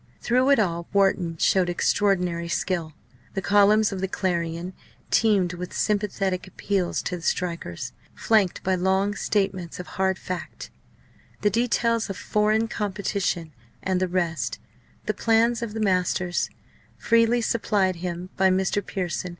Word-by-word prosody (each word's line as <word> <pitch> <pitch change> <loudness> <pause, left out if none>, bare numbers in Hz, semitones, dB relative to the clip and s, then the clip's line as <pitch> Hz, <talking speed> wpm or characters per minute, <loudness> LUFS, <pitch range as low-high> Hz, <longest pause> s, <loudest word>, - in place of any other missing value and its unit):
Through 255 +3 +2
it 280 - +6
all 170 -5 0
Wharton 190 -4 +2
showed 180 +2 +3
extraordinary 180 -2 +1
skill. 170 -2 -2 0.4
The 195 - -1
columns 205 +2 +4
of 190 -2 -4
the 190 - 0
Clarion 175 -2 -2 0.4
teemed 200 -6 +3
with 180 0 -7
sympathetic 195 -3 0
appeals 185 -1 -1
to 180 - -3
the - - -11
strikers, 170 - -3 0.2
flanked 210 -5 +2
by 190 - +1
long 190 +2 +1
statements 195 -4 -1
of 180 - -5 0.2
"hard 190 0 +2
fact" 180 -3 -6 0.7
the 205 - +2
details 230 -1 +1
of 195 - -4
foreign 215 +1 +1
competition 195 -6 -2 0.3
and 190 -1 +1
the 185 - +2
rest, 175 -2 -1 0.5
the - - 0
plans 230 +1 +2
of 225 -2 -4
the - - -2
masters 185 -3 +1 0.5
freely 230 +1 +3
supplied 205 -5 +1
him 180 +1 -5
by 190 0 +4
Mr. 190 +2 +1
Pearson. 180 -1 -3
190 Hz, 140 wpm, -25 LUFS, 180-210 Hz, 0.7 s, it